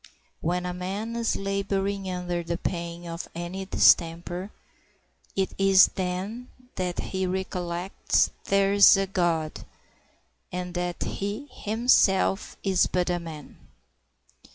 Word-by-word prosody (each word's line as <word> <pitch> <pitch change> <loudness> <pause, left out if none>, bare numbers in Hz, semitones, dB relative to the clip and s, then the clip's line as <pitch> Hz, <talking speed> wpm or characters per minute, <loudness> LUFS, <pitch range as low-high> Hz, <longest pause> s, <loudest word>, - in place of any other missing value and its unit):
When 180 +2 -1
a 180 - -3
man 195 +6 -4
is 235 -1 0
laboring 195 0 -2
under 180 -1 -2
the 170 0 -3
pain 170 -1 -4
of 170 0 -6
any 175 +3 -5
distemper, 175 +1 +3 0.9
it 190 -1 0
is 195 -1 +6
then 190 +7 -3 0.3
that 180 -1 -3
he 190 -1 -2
recollects 180 -1 -1
there 195 0 +3
is 200 0 +8
a 195 - +1
God, 170 -5 -1 0.9
and 180 0 -4
that 175 -1 -2
he 205 +9 -4
himself 215 -4 +2
is 190 -2 +3
but 180 0 0
a 175 - 0
man. 160 -3 -9
185 Hz, 120 wpm, -26 LUFS, 175-195 Hz, 0.9 s, is